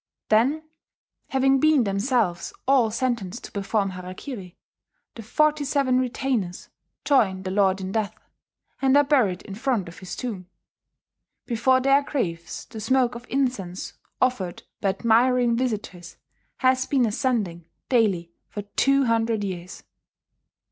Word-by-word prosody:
Then, 260 +9 +3 0.6
having 270 0 +3
been 305 -2 +4
themselves 200 -2 0
all 260 -4 +4
sentenced 230 -3 -2
to - - -9
perform 200 0 -1
harakiri, 185 +2 -8 0.6
the 230 - -9
forty 305 +6 +1
seven 275 -3 +2
retainers 245 -7 -2 0.4
join 195 -10 +2
their 185 -1 -3
lord 195 -1 +3
in 190 0 -4
death, 215 -1 -2 0.6
and 270 +1 +4
are 290 - +6
buried 250 -11 +2
in 195 - -8
front 225 -3 -1
of 170 -1 -11
his 185 - -7
tomb. 205 -8 -5 1.0
Before 255 +2 +3
their 275 +2 +4
graves 180 - -4
the 220 -2 -9
smoke 250 +2 +2
of 240 +1 -9
incense, 245 -10 -2 0.3
offered 210 -9 0 0.2
by 200 - +1
admiring 235 +4 +3
visitors, 210 -8 -4 0.4
has 260 0 +2
been 265 -4 +2
ascending 210 -7 -1 0.2
daily 195 -9 +1 0.2
for 205 - -6
two 275 +6 +2
hundred 225 -2 +1
years. 185 -2 -6
230 Hz, 130 wpm, -24 LUFS, 195-260 Hz, 1.0 s, are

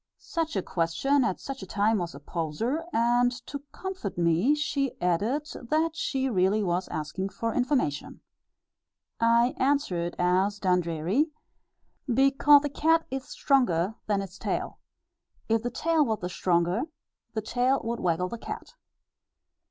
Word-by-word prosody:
Such 325 -4 -3
a 190 - 0
question 180 +12 +1
at 185 - -1
such 270 -3 -6
a 190 - -7
time 210 +3 +2
was 175 -3 -4
a - - -9
poser, 170 - -2
and, 240 +2 +3
to 285 - -5
comfort 375 - -5
me, 175 - +3
she 280 -2 -2
added, 210 - 0 0.2
that 320 +1 +1
she 270 -4 -1
really 205 -1 +2
was 180 0 -1
asking 175 +6 -4
for 230 +2 -3
information. 250 - -1 1.0
I 235 +2 +4
answered, 225 - 0
as 185 +3 +2
Dundreary, 180 - +1 0.8
"Becauth 275 +3 +5
a - - 0
cat 325 +3 +2
ith 265 0 -4
sthronger 205 -9 +2
than 200 -2 +1
its 190 -1 -10
tail; - - -3 0.7
if 225 0 +2
the 245 - -2
tail 320 +5 +2
wath 220 -6 -1
the 180 - -3
sthronger, 180 - +1 0.5
the 220 - -1
tail 250 +4 +1
would 235 +1 -2
waggle 180 +1 0
the 235 - -6
cat." 460 - -7
225 Hz, 145 wpm, -27 LUFS, 180-275 Hz, 1.0 s, Becauth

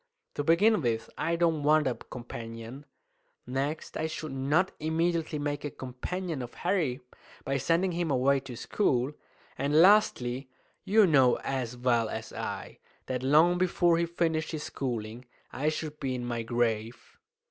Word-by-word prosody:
To - - -2
begin 200 +4 +4
with, 115 -3 -1
I 170 - 0
don't 165 -3 +1
want 150 +1 +4
a 130 - +1
companion; 120 +2 -9 0.6
next, 140 +4 -3
I 160 - -1
should 155 -1 -5
not 145 +8 +1
immediately 160 0 0
make 145 0 -3
a 145 - -2
companion 145 +5 -5
of 120 -1 -8
Harry 155 -11 0 0.4
by 135 0 0
sending 170 +7 +1
him 170 -1 -1
away 135 +1 +3
to 130 -2 -9
school; 130 - 0 0.5
and, 145 +3 +3
lastly, 140 -10 +4 0.4
you 215 +1 +5
know 135 -7 +5
as 125 -3 -3
well 120 -2 +2
as - - -6
I, - - -5 0.3
that 125 -1 -3
long 155 +7 +4
before 175 -2 +3
he 170 - +1
finished 165 -2 -1
his 155 -1 -3
schooling 120 -2 -4 0.3
I 150 +3 0
should 155 -1 -5
be 130 -2 -2
in 120 -1 -4
my 120 -1 -2
grave." 115 -1 -2
145 Hz, 155 wpm, -29 LUFS, 125-165 Hz, 0.6 s, you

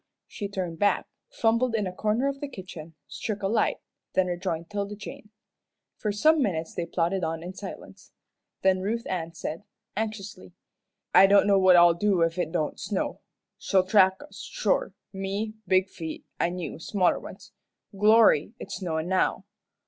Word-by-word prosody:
She 205 - -6
turned 180 -4 -4
back, 205 -2 +2 0.2
fumbled 230 +1 +1
in 210 -2 0
a 185 - -4
corner 215 +7 0
of 275 0 -3
the 290 - -3
kitchen, 175 - -10
struck 205 +6 -5
a - - +2
light, 215 +2 +1 0.4
then 185 - +3
rejoined 175 -2 -3
'Tilda 205 0 -4
Jane. 210 0 -10 0.7
For 210 - -2
some 310 +10 +4
minutes 165 -9 -1
they 170 - -3
plodded 175 +2 0
on 165 0 -2
in 180 +2 -6
silence. 195 0 -10 0.5
Then 190 -1 +4
Ruth 230 +4 -2
Ann 170 -2 -4
said, 165 +2 -5 0.3
anxiously, 200 - -5 0.6
"I 195 - +8
don' 200 +1 +5
know 200 -1 +4
what 185 -1 +6
I'll 175 -1 +7
do 190 +1 +1
if 165 +2 -1
it 160 - -1
don't 155 -3 -2
snow. 205 - -3 0.4
She'll 190 -2 +2
track 190 +2 +4
us 295 - -13
sure - - -1 0.2
me, 195 +3 -3
big 185 0 +3
feet, 160 -4 -7
an' 175 +2 0
you, 170 -3 -5
smaller 185 +2 +1
ones. - - -11 0.4
Glory, 210 -6 +5
it's - - -6
snowin' 165 -3 -3
now!" 190 0 +1
190 Hz, 165 wpm, -27 LUFS, 175-210 Hz, 0.7 s, I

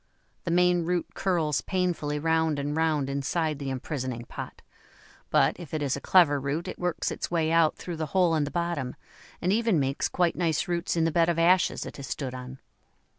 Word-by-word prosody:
The - - -2
main 175 0 +3
root 175 0 -2
curls 165 -7 0
painfully 175 -6 -1
round 160 0 +1
and 145 +1 -2
round 160 -4 +1
inside 145 +2 -1
the 140 -1 -4
imprisoning 130 -2 -4
pot, - - -8 0.7
but - - +3
if 165 -3 -7
it 155 - -1
is 135 -2 0
a 140 - -6
clever 160 -6 +5
root 140 +6 -2
it - - -6
works 180 -2 -1
its - - -4
way 160 -2 +1
out 165 -2 +4
through 175 -2 -6
the 155 -1 -2
hole 180 +1 +2
in 155 -2 +2
the 145 - -2
bottom, 170 -6 -2 0.5
and 185 +2 +2
even 225 -6 +2
makes 135 +1 0
quite 175 -2 +1
nice 165 0 0
roots 175 -1 -1
in 165 - +2
the 165 - +2
bed 165 +1 +3
of 170 - 0
ashes 180 +2 +3
it - - -8
has 140 -2 -7
stood 135 -3 -4
on. 130 +1 -8
160 Hz, 205 wpm, -27 LUFS, 145-175 Hz, 0.7 s, clever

